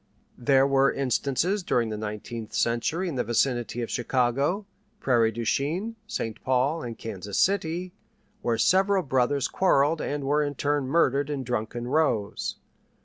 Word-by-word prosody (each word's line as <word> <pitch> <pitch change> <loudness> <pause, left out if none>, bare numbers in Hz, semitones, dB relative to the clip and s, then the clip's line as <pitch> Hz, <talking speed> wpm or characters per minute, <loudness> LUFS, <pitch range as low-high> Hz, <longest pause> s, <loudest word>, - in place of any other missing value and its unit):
There 135 +1 +4
were 135 0 +3
instances 140 - 0
during 120 -9 0
the 110 - -3
nineteenth 105 +1 -6
century 135 +10 0
in 155 -6 -3
the 125 - +1
vicinity 120 0 0
of - - -5
Chicago, 130 - 0 0.3
Prairie 115 -4 +3
du 115 +1 -5
Chien, 175 - -1
Saint 115 - -4
Paul, 130 +5 +1
and 115 -4 -6
Kansas 100 -2 -5
City, 180 -2 +1 0.5
where 115 -1 0
several 190 - +3
brothers 130 0 +1
quarrelled 155 -4 +2
and 145 0 -3
were 145 +2 +2
in 145 -1 -2
turn 145 -1 0
murdered 140 -2 +2
in 140 -3 -3
drunken 120 0 -3
rows. 130 -8 0
135 Hz, 145 wpm, -26 LUFS, 120-155 Hz, 0.5 s, There